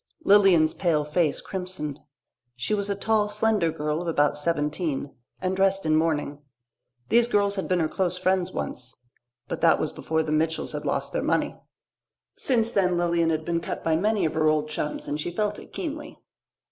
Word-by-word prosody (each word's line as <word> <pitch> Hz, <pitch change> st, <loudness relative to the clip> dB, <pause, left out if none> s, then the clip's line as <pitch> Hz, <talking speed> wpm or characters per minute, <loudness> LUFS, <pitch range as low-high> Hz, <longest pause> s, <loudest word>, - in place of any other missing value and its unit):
Lilian's 195 Hz, -, +5 dB
pale 160 Hz, -5 st, +1 dB
face 150 Hz, 0 st, 0 dB
crimsoned. 180 Hz, -6 st, -5 dB, 0.6 s
She 125 Hz, +12 st, -2 dB
was 205 Hz, -1 st, -1 dB
a 200 Hz, -, 0 dB
tall, 215 Hz, +1 st, +1 dB
slender 210 Hz, -5 st, +2 dB
girl 150 Hz, 0 st, -2 dB
of 175 Hz, -, -5 dB
about 145 Hz, -3 st, +2 dB
seventeen, 150 Hz, -1 st, -1 dB, 0.3 s
and 185 Hz, 0 st, -1 dB
dressed 195 Hz, -1 st, +2 dB
in 155 Hz, 0 st, +3 dB
mourning. 150 Hz, -2 st, 0 dB, 0.7 s
These 235 Hz, 0 st, +4 dB
girls 200 Hz, -3 st, +2 dB
had 190 Hz, -, -3 dB
been 180 Hz, -1 st, +1 dB
her 160 Hz, -, +2 dB
close 180 Hz, +1 st, -1 dB
friends 185 Hz, 0 st, +1 dB
once. 125 Hz, 0 st, -5 dB, 0.5 s
But -, -, -4 dB
that -, -, +5 dB
was -, -, -1 dB
before 160 Hz, 0 st, -1 dB
the 155 Hz, -, -4 dB
Mitchells 160 Hz, +1 st, 0 dB
had -, -, -5 dB
lost -, -, -1 dB
their -, -, 0 dB
money. -, -, 0 dB, 0.8 s
Since 230 Hz, -3 st, 0 dB
then 180 Hz, -4 st, +2 dB
Lilian 170 Hz, -1 st, +2 dB
had 160 Hz, -1 st, -1 dB
been 170 Hz, -1 st, 0 dB
cut -, -, -5 dB
by 160 Hz, -1 st, +2 dB
many 210 Hz, +4 st, +1 dB
of 155 Hz, -, -1 dB
her 155 Hz, 0 st, +2 dB
old 155 Hz, 0 st, +1 dB
chums 150 Hz, 0 st, -3 dB
and 150 Hz, +1 st, -2 dB
she 175 Hz, -, -2 dB
felt 210 Hz, +4 st, -2 dB
it -, -, -14 dB
keenly. 305 Hz, -3 st, -6 dB
170 Hz, 185 wpm, -25 LUFS, 155-195 Hz, 0.8 s, Lilian's